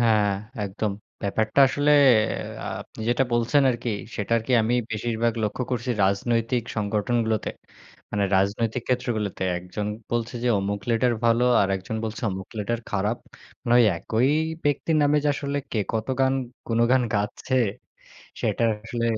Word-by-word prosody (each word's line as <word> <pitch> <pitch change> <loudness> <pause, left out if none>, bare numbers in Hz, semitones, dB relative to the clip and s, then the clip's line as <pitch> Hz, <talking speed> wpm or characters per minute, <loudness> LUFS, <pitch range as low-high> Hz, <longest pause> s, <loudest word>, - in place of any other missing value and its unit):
হ্যাঁ, 110 -3 +4 0.4
একদম। 100 +1 -2 0.3
ব্যাপারটা 110 +6 +1
আসলে 145 +2 +1 0.9
আপনি - - -12
যেটা 120 +2 +3
বলছেন 120 +5 +3
আরকি 120 -1 -3 0.3
সেটা 105 +3 0
কি 130 - 0
আমি 115 +3 +1 0.2
বেশিরভাগ 115 +2 0
লক্ষ্য 105 +4 -2
করছি 125 0 -1
রাজনৈতিক 115 +5 +1
সংগঠনগুলোতে। 110 +1 0 0.6
মানে 100 -1 0
রাজনৈতিক 110 +5 0
ক্ষেত্রগুলোতে। 120 -7 -1 0.2
একজন 90 +4 -5 0.2
বলছে 120 0 -2
যে - - +2
অমুক 100 +1 -2
লেটার 120 +1 +2
ভালো 115 +1 +4 0.2
আরেকজন 95 +2 -2
বলছে 110 +2 -5
অমুক 95 0 -6
লেটার 115 +3 -2
খারাপ। 105 +4 0 0.5
মানে 120 +1 +4 0.2
একই 115 +8 +1 0.4
ব্যক্তির 145 +2 +1
নামে 145 +1 +3
যে - - +3
আসলে 140 0 -2
কে 115 - 0 0.2
কত 110 0 -1
গান 135 0 +3 0.3
গুনগান 120 +2 +3
গাচ্ছে 105 +5 -2 0.9
সেটা 115 - 0 0.2
আসলে। 115 +1 -3
115 Hz, 135 wpm, -25 LUFS, 105-120 Hz, 0.9 s, হ্যাঁ